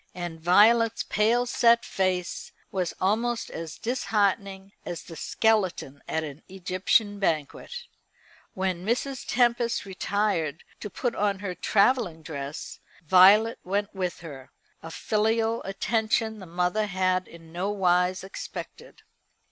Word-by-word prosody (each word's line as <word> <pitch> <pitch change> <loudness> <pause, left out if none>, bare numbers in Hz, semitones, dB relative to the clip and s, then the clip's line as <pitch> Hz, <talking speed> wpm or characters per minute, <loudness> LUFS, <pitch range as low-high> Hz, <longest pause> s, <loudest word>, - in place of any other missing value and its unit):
And 175 -2 -6
Violet's 220 +6 +4
pale 230 +3 +2
set 235 -1 +3
face 185 -2 -2 0.2
was 185 -3 -2
almost 230 +5 0
as 165 -1 -7
disheartening 200 -4 -1
as 170 - -6
the 165 - -11
skeleton 185 -10 0
at 160 - -1
an 150 -1 -8
Egyptian 190 +3 0
banquet. 170 - -2 0.7
When 185 -2 -2
Mrs. 250 +5 -2
Tempest 240 -2 +1
retired 190 -5 -1 0.2
to 210 - -6
put 240 +4 -2
on 200 -1 0
her 195 -2 -4
travelling 200 -2 +1
dress 140 -2 -6 0.3
Violet 195 +6 +6
went 200 +2 -2
with 185 -3 -3
her, 140 -5 -10 0.3
a 165 - -8
filial 225 +5 0
attention 220 +2 0
the 190 - -10
mother 180 +5 0
had 185 -1 0
in 165 -1 -14
no 180 +4 -2
wise 180 -2 +1
expected. 190 - -9
195 Hz, 125 wpm, -26 LUFS, 175-220 Hz, 0.7 s, Violet